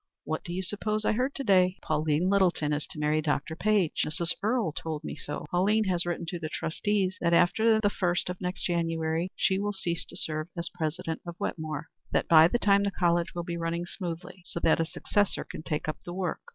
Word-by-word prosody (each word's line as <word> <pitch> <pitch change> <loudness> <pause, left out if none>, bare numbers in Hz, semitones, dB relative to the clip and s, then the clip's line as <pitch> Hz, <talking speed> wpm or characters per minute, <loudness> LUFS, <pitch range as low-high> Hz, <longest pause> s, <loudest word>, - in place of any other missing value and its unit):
What 155 - -3
do 175 - -6
you 185 +2 -2
suppose 210 +3 -1
I - - +4
heard 255 +5 0
to 275 - -3
day? 185 -4 +4
Pauline 155 +2 +1
Littleton 180 -6 +2
is 145 0 -2
to - - -10
marry 150 +1 +1
Dr. 155 +1 -1
Page. 200 -3 +2
Mrs. 165 +2 -1
Earle 220 -4 +1
told 155 0 -5
me - - -5
so. 150 0 -6
Pauline 205 +5 +3
has 180 -3 0
written 175 0 -2
to 175 - -4
the 155 -1 -4
trustees 190 +4 -1
that 170 0 +3
after 220 +6 +4
the 205 -2 +3
first 175 -3 0
of 180 +1 -5
next 180 0 -3
January 165 0 0
she 190 0 +2
will 205 +1 -1
cease 170 -3 -2
to 175 - -9
serve 155 -2 -2
as 170 0 -2
president 165 0 -3
of 175 -1 -7
Wetmore; 155 -2 -3 0.3
that - - +1
by 160 -1 +8
that 240 +7 -1
time 200 -1 +5
the 200 - +1
college 175 -3 +1
will 175 - -2
be 170 0 -4
running 170 +1 -2
smoothly, 175 0 -6
so 170 - -5
that 160 - +4
a 165 - +2
successor 205 +4 0
can - - -8
take 155 -2 -3
up 155 - -2
the 175 - -6
work. 185 -3 -2
175 Hz, 220 wpm, -28 LUFS, 160-190 Hz, 0.3 s, by